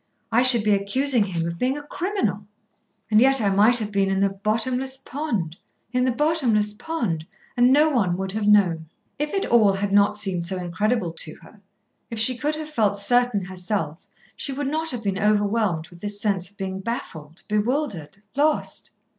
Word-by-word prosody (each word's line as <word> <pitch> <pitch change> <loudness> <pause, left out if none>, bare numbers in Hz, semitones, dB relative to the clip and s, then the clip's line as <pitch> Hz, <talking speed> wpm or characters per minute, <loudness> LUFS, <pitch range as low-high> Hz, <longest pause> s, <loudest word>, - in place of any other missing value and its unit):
I 230 +2 +4
should 250 -3 +7
be 210 - +2
accusing 225 +4 +1
him 170 -4 -3
of 170 0 -5
being 260 +3 0
a 295 - -7
criminal. 290 - -3 0.6
And 215 +1 +5
yet 270 +1 +5
I 205 -3 +1
might 215 +5 +5
have 215 -3 -3
been 195 -1 +1
in 195 0 0
the 195 0 +2
bottomless 230 +6 -2
pond, 245 - -4 0.3
in 250 0 +1
the 255 - +2
bottomless 245 -8 +1
pond, 210 - -3 0.3
and 245 +1 +4
no 295 +3 +5
one 205 - +1
would 190 0 -3
have 210 +1 -2
known." 175 -7 +3 0.3
If 295 0 -2
it 390 - 0
all 215 -4 +4
had 195 +1 -2
not 205 +1 +4
seemed 185 -5 -2
so 190 - -2
incredible 180 +1 -1
to 160 -1 -4
her, 210 - -17 0.5
if 230 - -6
she 235 +4 +4
could 300 +4 -2
have 310 0 -6
felt 210 -7 +1
certain 235 -1 +1
herself, 180 -3 -4 0.3
she 280 - -1
would 285 +2 -3
not 320 +1 -1
have 245 -5 -2
been 195 -1 -1
overwhelmed 205 -5 +1
with 175 - -15
this 205 +1 -3
sense 195 -4 -1
of 205 - -24
being 190 -1 -4
baffled, 180 -6 -6
bewildered, 210 - -2 0.2
lost. 300 +2 -1
210 Hz, 190 wpm, -23 LUFS, 195-255 Hz, 0.6 s, should